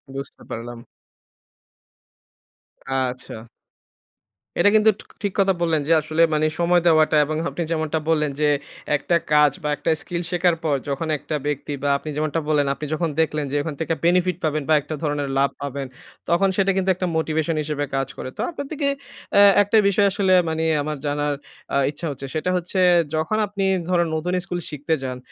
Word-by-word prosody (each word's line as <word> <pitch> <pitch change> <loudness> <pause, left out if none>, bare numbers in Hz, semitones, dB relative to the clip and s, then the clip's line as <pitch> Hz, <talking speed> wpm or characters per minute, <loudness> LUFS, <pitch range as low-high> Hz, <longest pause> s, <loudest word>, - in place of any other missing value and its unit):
বুঝতে 135 0 -7
পারলাম। 120 +1 -6 2.1
আচ্ছা। 125 -4 -3 1.2
এটা 205 - +6
কিন্তু 215 0 +6
ঠ - - -7 0.2
ঠিক 200 - -1
কথা 195 -1 +4
বললেন 160 -3 +2
যে 165 - +4
আসলে 155 +2 -1
মানে 155 0 +2
সময় 175 0 +3
দেওয়াটা 155 -1 +4
এবং 155 +1 -3
আপনি 170 - -3
যেমনটা 160 -1 0
বললেন 150 -3 +2
যে 150 - +4 0.5
একটা 170 +4 0 0.2
কাজ 150 -1 +6
বা 150 - -1
একটা 165 - -3
স্কিল 175 -1 -4
শেখার 175 -1 +2
পর 150 -3 +1
যখন 140 +4 -2
একটা 150 - -5
ব্যক্তি 145 0 -3
বা 145 - +1
আপনি 155 - -8
যেমনটা 155 +1 -1
বললেন 145 -2 +2
আপনি 150 - -6
যখন 165 +1 0
দেখলেন 150 -2 -1
যে 145 - -2
ওখান 150 0 -4
থেকে 165 - 0
বেনিফিট 180 0 +2
পাবেন, 155 -2 0
বা - - +5
একটা 155 - -5
ধরনের 145 -2 -1
লাভ 140 0 +3
পাবেন 140 -1 -4 0.4
তখন 185 +3 +3
সেটা 195 -1 +3
কিন্তু 190 0 +1
একটা 185 0 -2
মোটিভেশন 160 0 0
হিসেবে 150 -1 -2
কাজ 135 -1 0
করে। - - -5
তো - - -2
আপনার 285 -5 -6
থেকে 290 -2 -1 0.5
অ্যা 200 - +6 0.2
একটা 210 +2 +2
বিষয় 200 +1 +3
আসলে 190 -1 +2 0.2
মানে 160 0 -1 0.2
আমার 150 0 -3
জানার 145 0 0 0.4
আ - - +4
ইচ্ছা 150 +3 -7
হচ্ছে। 135 0 -7
সেটা 155 +3 -1
হচ্ছে 180 +2 -2 0.4
যখন 160 +7 0
আপনি 200 -1 -2 0.2
ধরুন 175 -2 +2
নতুন 175 +3 -2
স্কিল 175 0 -3
শিখতে 150 +2 -2
যান, 125 -1 -4
155 Hz, 180 wpm, -22 LUFS, 145-175 Hz, 2.1 s, এটা